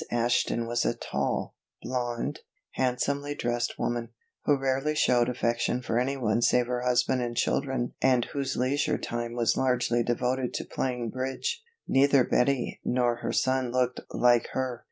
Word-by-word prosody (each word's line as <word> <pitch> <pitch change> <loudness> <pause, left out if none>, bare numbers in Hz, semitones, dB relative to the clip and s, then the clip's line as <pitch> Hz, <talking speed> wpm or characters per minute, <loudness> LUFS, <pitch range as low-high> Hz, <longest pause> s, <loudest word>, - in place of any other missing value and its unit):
Ashton 120 0 +1
was 120 0 0
a - - 0
tall, - - -2 0.3
blonde, 120 -2 -2 0.3
handsomely 140 +3 -1
dressed 120 -3 -1
woman, 120 -1 -2 0.4
who 145 - +4
rarely 135 +3 0
showed 125 -4 +3
affection 120 0 0
for 120 - 0
anyone 125 -4 0
save 120 0 +3
her 125 0 -2
husband 125 +1 +2
and 120 -1 -3
children 130 -3 0
and 130 -2 +3
whose 135 -2 -3
leisure 135 +3 +1
time 120 0 -4
was 115 -3 +2
largely 125 -2 +1
devoted 125 +2 -1
to - - -3
playing 125 -3 -2
bridge. 130 - -3 0.3
Neither 135 0 +4
Betty 125 +1 0
nor 120 -1 +1
her - - -3
son 130 -1 +1
looked 125 0 0
like 120 -1 +3
her. 130 -2 -2
125 Hz, 150 wpm, -28 LUFS, 120-130 Hz, 0.4 s, who